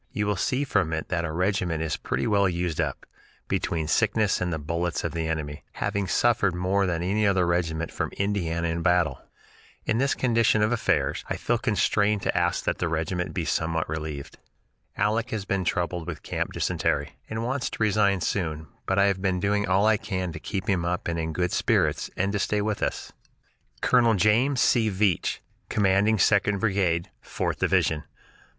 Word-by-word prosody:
You 105 - -1
will 105 0 +1
see 130 +9 0
from 100 - 0
it 80 - -3
that 85 -1 -1
our 80 - -3
regiment 90 -2 0
is 80 - -1
pretty - - -2
well 100 -4 +3
used 85 -2 -1
up, - - -3 0.4
between 80 -2 -1
sickness 105 +5 +2
and 90 -1 -1
the 80 - -1
bullets 85 +3 -2
of - - -2
the 80 -1 -2
enemy, 75 -2 -4
having 100 -1 -2
suffered 100 -2 +2
more 95 +2 +1
than 85 -1 -1
any 105 +4 +1
other 95 -2 +3
regiment 85 -2 -1
from - - -3
Indiana 85 -5 -1
in 85 +1 -2
battle. 90 -6 +2 0.6
In 110 +1 +1
this 140 +1 +2
condition 115 -3 +2
of 110 - +2
affairs, 120 - 0
I - - -1
feel 120 -1 0
constrained 105 -2 +1
to - - 0
ask 85 0 +1
that - - -1
the 90 - 0
regiment 85 +3 -2
be 85 -4 -1
somewhat 80 0 -1
relieved. 75 -2 -6 0.6
"Aleck 110 +3 +1
has 110 -5 -3
been 95 -1 -1
troubled 85 -1 -1
with 85 -4 -6
camp - - -3
dysentery, - - -1
and 110 +1 -3
wants 130 +1 -1
to - - -7
resign 100 -3 +2
soon 80 -6 -2 0.2
but 95 - +1
I 100 - +5
have 100 -2 +1
been 95 -2 0
doing 100 +1 +1
all 95 +2 +3
I 110 -1 +4
can 95 -4 -3
to - - -7
keep 95 -3 -4
him 95 -4 +1
up 90 +1 -2
and 85 -1 -1
in 80 0 -2
good 90 +2 -1
spirits, - - +1
and 100 +2 +1
to 105 - 0
stay 105 +1 0
with 105 -1 -2
us." - - -2 0.7
Col. 120 -3 +4
James 115 +7 +3
C. 115 -2 +3
Veatch, 95 -3 0 0.3
Commanding 100 +2 +3
Second 100 0 +3
Brigade, 95 -4 0
Fourth - - -3
Division. 80 -1 +1
95 Hz, 190 wpm, -26 LUFS, 85-105 Hz, 0.7 s, I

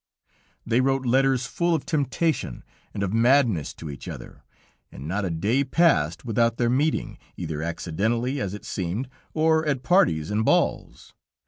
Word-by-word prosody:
"They 115 +2 +2
wrote 135 0 +1
letters 130 0 +2
full 170 +4 0
of 155 - -3
temptation 150 - -1 0.3
and 100 - -3
of 100 0 -2
madness 115 - +3
to 80 - -9
each 70 - -10
other, - - -9 0.5
and 70 +4 -9
not 100 +4 -1
a - - -1
day 105 +12 +1
passed 105 - +2
without 115 0 +1
their 120 -1 +1
meeting, 145 +5 0 0.2
either 75 -1 -4
accidentally, 110 - -1
as 100 0 -3
it 105 - -11
seemed, 95 +8 -3 0.3
or 160 0 +3
at 140 -4 -1
parties 85 - +2
and 105 +1 +1
balls. - - 0
120 Hz, 155 wpm, -25 LUFS, 95-135 Hz, 0.5 s, madness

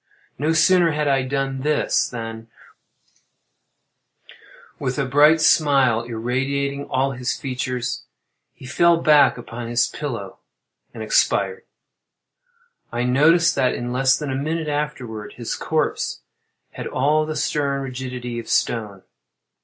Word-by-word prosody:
No 150 +3 +1
sooner 170 0 +4
had 150 0 -1
I 135 -1 +2
done 135 0 -2
this, 150 +1 +1
than, 115 -1 -7 2.3
with 130 +1 -2
a 145 - 0
bright 145 +5 +5
smile 135 -7 +4
irradiating 135 +5 -2
all 135 +1 0
his 125 -2 -3
features, 130 -3 -4 0.5
he - - -15
fell 170 +6 +3
back 150 -5 +4
upon 120 -1 -7
his 120 0 +2
pillow 115 -10 -6 0.5
and - - -7
expired. 470 -2 +1 1.3
I 120 +1 -2
noticed 155 +7 +4
that 125 - +1
in 120 0 -4
less 130 0 +3
than 145 -2 -4
a - - -2
minute 155 +3 -2
afterward 145 -8 -4
his 120 -2 -5
corpse 155 -1 -2 0.5
had - - -6
all 150 +4 +1
the 155 - -4
stern 140 -3 -1
rigidity 125 -2 -5
of 115 - -9
stone. 105 -5 -1
135 Hz, 125 wpm, -22 LUFS, 125-150 Hz, 2.3 s, bright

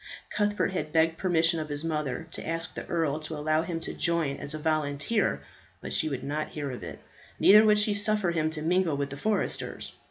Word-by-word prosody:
Cuthbert 205 -1 +1
had 155 -5 -3
begged 165 +1 +2
permission 170 -2 +2
of 155 -1 -4
his 145 +2 -2
mother 150 -3 -2
to - - -6
ask 165 0 -3
the - - -7
earl 160 -3 0
to 155 0 -6
allow 155 +1 +1
him 165 0 -3
to - - -5
join 170 -5 0
as 145 - -1
a - - -2
volunteer, 155 +6 0 0.4
but - - -6
she 155 - +1
would 135 -3 -4
not 150 +2 -2
hear 145 -3 -4
of 125 - -7
it. - - -7 0.4
Neither 210 +2 +8
would 210 -1 +5
she 210 0 +2
suffer 205 -3 +1
him 155 -2 +1
to 155 -1 -3
mingle 170 -2 +2
with 140 -1 -2
the 140 - -6
foresters. 210 +8 -2
160 Hz, 215 wpm, -28 LUFS, 150-180 Hz, 0.4 s, Neither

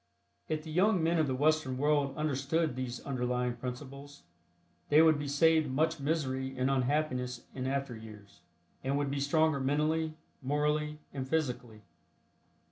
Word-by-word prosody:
If 155 -1 -1
the 160 - -8
young 185 +1 +3
men 165 +1 +2
of 155 - +2
the 130 - -1
Western 145 -2 +1
world 145 0 +1
understood 150 0 0
these 130 -1 -4
underlying 125 -2 -1
principles 140 +1 -8 0.7
they 150 - +6
would 160 -2 +6
be 145 - -3
saved 155 +1 +3
much 160 +4 +1
misery 135 -3 -2
and 130 +2 +1
unhappiness 125 -2 -1
in 130 -1 -3
after 135 -2 -2
years, 105 -3 -13 0.4
and 135 +2 0
would 145 -1 -1
be 140 - -1
stronger 155 +1 +2
mentally, 155 +3 0 0.3
morally 150 +2 0 0.2
and 130 -2 -4
physically. 125 -8 -2
140 Hz, 145 wpm, -31 LUFS, 130-155 Hz, 0.7 s, they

